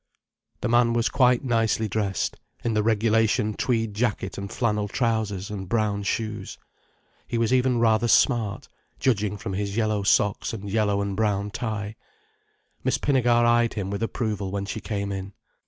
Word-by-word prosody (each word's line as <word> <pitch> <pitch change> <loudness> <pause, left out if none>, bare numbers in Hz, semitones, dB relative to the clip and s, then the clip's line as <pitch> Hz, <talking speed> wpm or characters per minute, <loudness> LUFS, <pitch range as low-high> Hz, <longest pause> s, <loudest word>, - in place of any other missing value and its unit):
The - - 0
man 120 0 +3
was 120 0 +1
quite 125 -1 +3
nicely 115 -3 +1
dressed, 100 -2 -2 0.2
in 115 - 0
the 105 - +2
regulation 110 0 +2
tweed 115 -2 -1
jacket 105 -3 -1
and 100 -1 -6
flannel 105 -3 0
trousers 105 -4 -1
and 95 -3 -6
brown 105 -2 0
shoes. 110 +1 -3 0.7
He 120 - -2
was 115 +1 +1
even 125 -1 +3
rather 115 0 +3
smart, 115 -4 +2 0.3
judging 105 -5 +1
from 105 -1 -5
his 100 +2 -3
yellow 110 -2 +1
socks 100 +2 +2
and 100 -2 -6
yellow 100 -1 +1
and 100 -1 -3
brown 105 -1 0
tie. 110 -1 -4 0.9
Miss - - +1
Pinnegar 120 -4 +3
eyed 120 0 +3
him 100 -2 -3
with 100 - -3
approval 110 -4 -2
when 100 +1 -3
she 100 +2 -5
came 100 -2 -3
in. 95 0 -5
110 Hz, 160 wpm, -25 LUFS, 100-115 Hz, 0.9 s, man